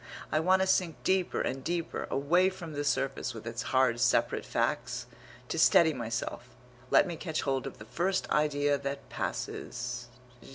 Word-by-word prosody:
I 155 - +3
want 185 +3 +4
to - - -1
sink 180 -4 +2
deeper 185 -1 +1
and 135 0 -2
deeper, 170 0 -2
away 175 +7 +3
from 175 -4 -8
the 145 0 -2
surface, 135 -3 -1
with 110 - -8
its 115 0 -4
hard 130 -3 +3
separate 125 0 +2
facts. - - -1 0.4
To - - -2
steady 160 -2 +6
myself, 120 0 -4 0.4
let - - +6
me 175 -3 -4
catch 160 -1 -3
hold 135 -2 -1
of - - -8
the 105 - -11
first 185 - -1
idea 145 -1 +2
that 140 0 -5
passes.... 125 0 -4
145 Hz, 165 wpm, -30 LUFS, 125-170 Hz, 0.4 s, steady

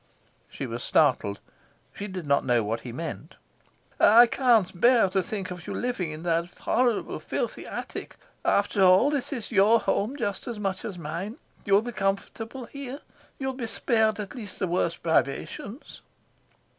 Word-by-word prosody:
She - - -5
was - - -5
startled. 100 0 +2 0.5
She 205 - -6
did 185 -4 -6
not 140 -1 +2
know 120 -3 +2
what 110 +2 -2
he 120 +1 -8
meant. 160 +4 -6 0.6
"I 235 +3 +8
can't 230 -8 +2
bear 240 -4 +6
to 190 +1 +1
think 190 -1 -4
of 180 -1 -8
you - - -4
living 245 -9 -2
in 155 +2 -8
that 170 0 0
horrible, 245 -3 +1
filthy - - -3
attic. - - -6 0.3
After 200 0 +2
all, 190 +9 +6
this 285 -1 -2
is 245 -6 -5
your 215 +2 +5
home 220 +4 0
just 200 -8 -3
as 235 -3 -4
much 195 -2 -2
as 195 -4 -5
mine. 170 - -5 0.3
You'll 200 +1 +4
be 240 - -4
comfortable 225 +5 -3
here. 280 +2 -8 0.4
You'll 265 -1 -2
be 250 -3 -4
spared 220 -2 +1
at 205 -2 -5
least 210 -7 -7
the - - 0
worst 170 -1 -1
privations." 170 - -2
200 Hz, 165 wpm, -26 LUFS, 175-235 Hz, 0.6 s, I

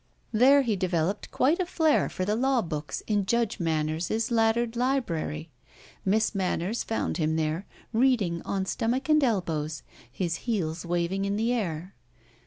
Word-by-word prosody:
There 265 +5 +6
he 225 -4 0
developed 185 +1 -1
quite 300 +7 +2
a 370 - +1
flair 320 -4 +2
for 185 - -3
the 210 +2 +1
law 260 +1 +2
books 150 -3 -4
in 205 -3 0
Judge 235 -1 +1
Manners's 165 +7 -1
laddered 225 +1 +2
library. 175 - -1 0.5
Miss 215 +4 +2
Manners 190 +2 -1
found 225 - -2
him 160 -2 +1
there, 160 +4 -1 0.3
reading, 220 -9 +2
on 195 -1 -2
stomach 250 +8 -1
and 305 -1 +5
elbows, 160 - -1 0.3
his 170 +1 -2
heels 170 -6 -1
waving 175 +3 0
in 200 0 0
the 225 +3 +1
air. 185 -5 -3
200 Hz, 150 wpm, -27 LUFS, 170-235 Hz, 0.5 s, There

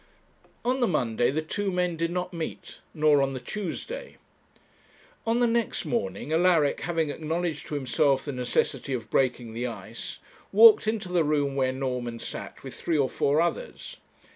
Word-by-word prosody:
On 255 +2 +1
the 240 - +3
Monday 120 -7 +1
the 155 +3 -1
two 195 +5 -2
men 180 -1 0
did 165 +1 -1
not 180 +1 -3
meet, 170 +2 -6
nor 150 -3 +4
on 135 0 0
the - - -3
Tuesday. 210 - -5 1.1
On 230 +1 +2
the - - +5
next 235 -1 0
morning, 225 -9 -2
Alaric, 165 -3 +3
having 165 -3 0
acknowledged 160 +1 -3
to 150 - -4
himself 135 0 +2
the 145 - -3
necessity 125 +1 -1
of 120 -3 -4
breaking 125 -3 +1
the 120 +2 -2
ice, 110 -5 -7 0.3
walked 220 +1 +8
into 215 -4 -1
the 175 -2 +3
room 145 -2 +1
where 130 -1 +2
Norman 125 -3 -3
sat - - -6
with - - -7
three 165 -2 -1
or 135 -3 +2
four 145 +3 +2
others. 480 - -3
155 Hz, 165 wpm, -27 LUFS, 135-180 Hz, 1.1 s, walked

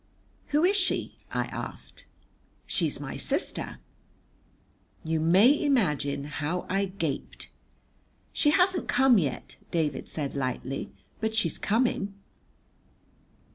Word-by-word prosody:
"Who 300 +2 +2
is 390 +3 +4
she?" 375 -2 0
I - - 0
asked. - - -6 0.6
"She's - - 0
my - - -5
sister." - - -1 1.3
You 160 0 0
may 190 - +5
imagine 150 - +1
how 150 +4 -3
I 195 +1 +1
gaped. 170 -7 -4 0.8
"She 295 - +3
hasn't 360 +2 +3
come 255 -3 +5
yet," 140 -7 -3
David 160 -3 -1
said 145 -3 -3
lightly, 130 0 -3 0.3
"but 220 0 -1
she's 225 - +1
coming." 215 -3 +1
195 Hz, 105 wpm, -28 LUFS, -, 1.3 s, may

